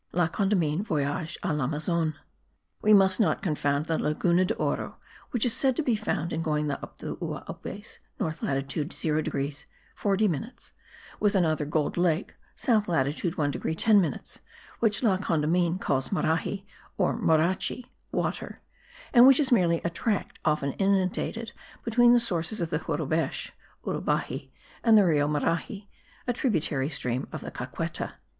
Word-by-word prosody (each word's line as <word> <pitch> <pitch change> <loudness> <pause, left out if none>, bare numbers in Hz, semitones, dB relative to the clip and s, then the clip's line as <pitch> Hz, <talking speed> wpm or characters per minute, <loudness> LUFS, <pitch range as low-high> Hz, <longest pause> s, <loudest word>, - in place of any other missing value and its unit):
La 175 -1 +3
Condamine, 175 -3 +1
Voyage 155 -3 -2
a - - 0
l'Amazone. 155 +3 0 0.7
We 215 - +3
must 195 -1 +6
not 215 - +2
confound 145 -3 0
the 160 -1 -1
Laguna 170 +4 +2
de - - -1
Oro, - - -2 0.3
which 240 -2 0
is 240 - +2
said 265 -2 +2
to 320 - 0
be 245 -5 +2
found 175 -6 -2
in 160 - -1
going 150 -2 0
up 140 - -7
the - - -5
Uaupes - - -7 0.2
(north 160 0 -3
latitude 140 +3 -2
0 155 -1 0
degrees 140 0 -4 0.3
40 205 +1 +1
minutes) 225 - -5 0.5
with 210 -1 +2
another 160 -5 +2
gold 150 +2 -1
lake 175 0 +1 0.2
(south 220 -6 +1
latitude 160 +2 0
1 145 -3 +1
degree 160 - -3
10 210 +3 +5
minutes) 165 - -4 0.4
which 220 +1 +2
La 200 -5 +3
Condamine 170 0 +1
calls 135 -8 -1
Marahi 190 +2 -1 0.3
or 185 - +1
Morachi 180 +9 +1 0.3
(water), - - -3 0.5
and 245 0 +9
which 270 +1 +7
is 280 -3 +3
merely 170 -8 +3
a 170 - -1
tract 205 +3 -2
often 150 -2 +1
inundated 200 +4 0 0.3
between 240 +1 +5
the 240 - +6
sources 205 -2 0
of 170 -2 -2
the 150 - 0
Jurubech 160 0 -2 0.3
(Urubaxi) - - -2 0.3
and 225 -2 +6
the 205 - +6
Rio 150 -4 +3
Marahi, 170 - -2 0.4
a 245 - 0
tributary 160 - 0
stream 130 -4 -2
of - - -6
the - - -7
Caqueta.) - - -4
170 Hz, 155 wpm, -27 LUFS, 150-210 Hz, 0.7 s, and